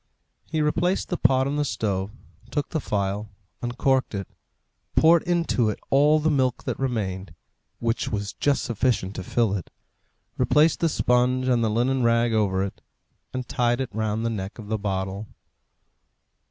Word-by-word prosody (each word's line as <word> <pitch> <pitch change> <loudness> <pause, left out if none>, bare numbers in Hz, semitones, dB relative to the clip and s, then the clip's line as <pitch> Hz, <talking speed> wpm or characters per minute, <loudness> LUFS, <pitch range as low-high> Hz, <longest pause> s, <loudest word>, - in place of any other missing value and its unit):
He 155 -1 0
replaced 175 +5 0
the 180 - 0
pot 130 +1 +3
on 140 +2 -1
the 150 - +2
stove, 100 -8 -1 0.4
took 145 -3 -2
the 160 - -1
phial, 100 0 -2 0.3
uncorked 130 0 0
it, 100 -2 -4 0.7
poured 165 +1 +6
into 170 -10 +1
it 105 - -4
all 145 +3 +5
the 155 +1 +1
milk 130 -4 +1
that - - -3
remained, 95 -9 -3 0.4
which 115 +3 -1
was 100 -3 -3
just 145 -1 +1
sufficient 115 -4 0
to 95 - -4
fill 110 +1 +1
it, 90 - -5 0.7
replaced 155 +2 +4
the 165 - +2
sponge 125 -1 +2
and 120 -2 +3
the 110 - +2
linen 125 +4 +1
rag 115 0 +3
over 95 -3 +1
it, 100 - -6 0.5
and 130 -1 -4
tied 120 0 +1
it 130 -4 -3
round 110 +1 -1
the 115 - 0
neck 100 -3 -5
of 105 -3 -9
the 110 -1 -1
bottle. 95 +1 -3
120 Hz, 165 wpm, -25 LUFS, 105-135 Hz, 0.7 s, poured